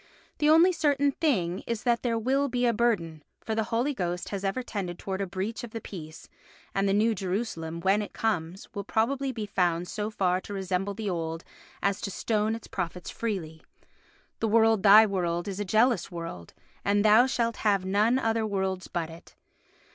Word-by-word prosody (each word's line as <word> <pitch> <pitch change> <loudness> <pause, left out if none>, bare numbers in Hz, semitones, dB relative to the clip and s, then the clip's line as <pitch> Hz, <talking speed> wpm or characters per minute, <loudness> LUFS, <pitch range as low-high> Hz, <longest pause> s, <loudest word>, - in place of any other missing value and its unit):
The 300 - +3
only 330 +4 +7
certain 285 -4 +2
thing 195 - 0
is 230 -2 -3
that 240 -2 +2
there 235 -2 0
will 270 +5 +1
be 245 0 0
a 235 - +3
burden, 195 -9 0 0.2
for 220 - -1
the 220 0 0
Holy 240 +6 0
Ghost 180 -5 -3
has 200 -1 -4
ever 200 +6 -1
tended 190 -7 -4
towards 195 0 -4
a 195 - -2
breach 195 +6 -4
of 240 - -6
the 225 - -3
peace, 160 -7 -9 0.5
and 195 0 +1
the - - +3
New 220 +3 +3
Jerusalem, 180 -4 -3
when 195 +4 +3
it 205 - -6
comes, 190 -4 -2
will 200 -2 -4
probably 260 +6 0
be 225 -4 -4
found 180 -3 0
so 210 +2 -3
far 185 -4 0
to 205 - -7
resemble 190 +1 -2
the 215 0 -4
old 165 -1 -3 0.4
as 200 0 +1
to - - -3
stone 215 +2 0
its 230 - -9
prophets 180 -1 -5
freely. 170 -8 -4 0.8
The 225 - 0
world 225 -1 +4
thy 210 +2 +8
world 175 -3 -1
is 195 0 -4
a 205 - -2
jealous 220 0 +2
world, 165 - -7 0.3
and 205 +1 +2
thou 220 +4 +7
shalt 235 -3 -1
have 200 -3 +1
none 210 +6 +3
other 225 -3 0
worlds 190 -3 -2
but 165 -2 -3
it. 165 +2 -14
205 Hz, 195 wpm, -28 LUFS, 180-230 Hz, 0.8 s, thy